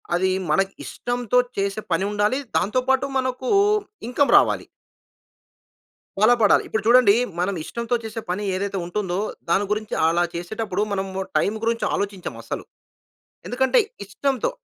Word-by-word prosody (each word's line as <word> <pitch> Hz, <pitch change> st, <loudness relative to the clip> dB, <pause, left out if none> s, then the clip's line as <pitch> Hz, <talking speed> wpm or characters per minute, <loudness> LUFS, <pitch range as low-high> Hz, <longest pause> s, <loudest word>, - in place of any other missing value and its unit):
అది 185 Hz, +1 st, +2 dB, 0.2 s
మనకు 195 Hz, +5 st, +2 dB
ఇష్టంతో 245 Hz, 0 st, -2 dB, 0.2 s
చేసే 195 Hz, +2 st, -1 dB
పని 190 Hz, -, +2 dB
ఉండాలి. 210 Hz, +6 st, +1 dB, 0.2 s
దాంతో 210 Hz, +8 st, +1 dB
పాటు 265 Hz, +1 st, +3 dB
మనకు 255 Hz, 0 st, -2 dB, 0.6 s
ఇన్‌కమ్ 265 Hz, +3 st, +2 dB
రావాలి. -, -, +2 dB, 1.5 s
బల 215 Hz, +3 st, +6 dB
పడాలి. 210 Hz, -, +5 dB
ఇప్పుడు 220 Hz, -, -2 dB
చూడండి 240 Hz, -3 st, +6 dB, 0.3 s
మనం 190 Hz, +3 st, 0 dB
ఇష్టంతో 235 Hz, +8 st, -3 dB
చేసే 220 Hz, +1 st, -5 dB
పని 195 Hz, +4 st, -2 dB
ఏదైతే 195 Hz, +1 st, -2 dB
ఉంటుందో, 180 Hz, 0 st, -2 dB, 0.3 s
దాని 190 Hz, +4 st, +2 dB
గురించి 215 Hz, 0 st, -2 dB
అలా 170 Hz, +2 st, +2 dB
చేసేటప్పుడు 200 Hz, +3 st, -3 dB
మనం 195 Hz, -1 st, -1 dB, 0.3 s
టైం 205 Hz, -, +2 dB
గురించి 230 Hz, 0 st, 0 dB
ఆలోచించం 200 Hz, -2 st, -3 dB
అస్సలు. -, -, -5 dB, 0.8 s
ఎందుకంటే, 265 Hz, -, +2 dB, 0.3 s
ఇష్టంతో 270 Hz, -, -1 dB
210 Hz, 130 wpm, -23 LUFS, 195-245 Hz, 1.5 s, బల